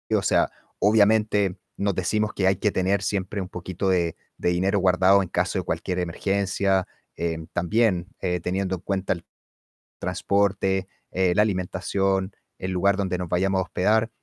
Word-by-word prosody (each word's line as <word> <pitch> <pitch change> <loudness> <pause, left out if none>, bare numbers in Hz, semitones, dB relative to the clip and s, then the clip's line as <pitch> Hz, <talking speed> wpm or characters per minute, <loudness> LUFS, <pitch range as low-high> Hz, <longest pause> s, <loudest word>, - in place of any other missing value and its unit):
O - - +2
sea, - - +2 0.3
obviamente 105 -2 +3 0.2
nos 100 -2 0
decimos 105 +4 0
que 95 - 0
hay 95 0 +3
que 105 - +1
tener 95 +1 +1
siempre 100 0 -2
un 90 - -6
poquito 95 +1 -3
de 85 -3 +1 0.2
de - - 0
dinero 95 +3 +1
guardado 95 +1 +4
en 90 - -7
caso - - 0
de - - -3
cualquier 90 -1 -2
emergencia. 95 +1 0 0.3
Em, 80 -1 -3
también, 90 0 +1
eh, 90 -1 -1
teniendo 95 +2 -1
en 85 - -10
cuenta 95 0 -1
el 85 -2 -10 0.7
transporte, 95 -1 0 0.2
eh, 90 -1 +1
la - - +5
alimentación, 95 0 -1 0.2
el 95 - -4
lugar 95 +2 +2
donde 95 -2 -1
nos 90 -1 -4
vayamos 95 +2 +1
a - - +1
hospedar, 110 +5 +1
95 Hz, 165 wpm, -25 LUFS, 90-100 Hz, 0.7 s, la